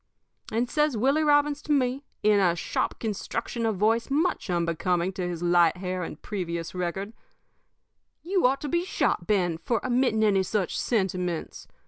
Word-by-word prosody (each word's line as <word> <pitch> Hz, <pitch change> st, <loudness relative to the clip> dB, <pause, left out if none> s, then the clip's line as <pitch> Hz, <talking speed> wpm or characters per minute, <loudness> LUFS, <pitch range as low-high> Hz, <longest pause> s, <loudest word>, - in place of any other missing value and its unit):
"And 235 Hz, +3 st, 0 dB
says 300 Hz, -2 st, +1 dB
Willie 275 Hz, +7 st, +2 dB
Robbins 290 Hz, 0 st, +3 dB
to -, -, -5 dB
me, 265 Hz, -1 st, +1 dB, 0.2 s
in 210 Hz, -1 st, +5 dB
a 175 Hz, -3 st, +3 dB
sharp 170 Hz, -, -2 dB
construction 230 Hz, +2 st, -3 dB
of 220 Hz, -, 0 dB
voice 225 Hz, +5 st, +2 dB
much 305 Hz, -, 0 dB
unbecoming 175 Hz, +1 st, 0 dB
to 180 Hz, -1 st, -3 dB
his 175 Hz, -1 st, -4 dB
light 175 Hz, 0 st, +4 dB
hair 185 Hz, 0 st, -3 dB
and 160 Hz, -3 st, -6 dB
previous 170 Hz, -5 st, -4 dB
record: 185 Hz, +4 st, -3 dB, 1.1 s
"'You 365 Hz, -5 st, +3 dB
ought 270 Hz, +2 st, 0 dB
to 295 Hz, -, -3 dB
be 340 Hz, +5 st, 0 dB
shot, 180 Hz, -, -1 dB
Ben, 175 Hz, -6 st, +1 dB
for 225 Hz, +7 st, 0 dB
emitting 245 Hz, -3 st, +2 dB
any 200 Hz, -3 st, +4 dB
such 190 Hz, 0 st, -1 dB
sentiments. 185 Hz, -6 st, -2 dB
210 Hz, 160 wpm, -26 LUFS, 180-255 Hz, 1.1 s, in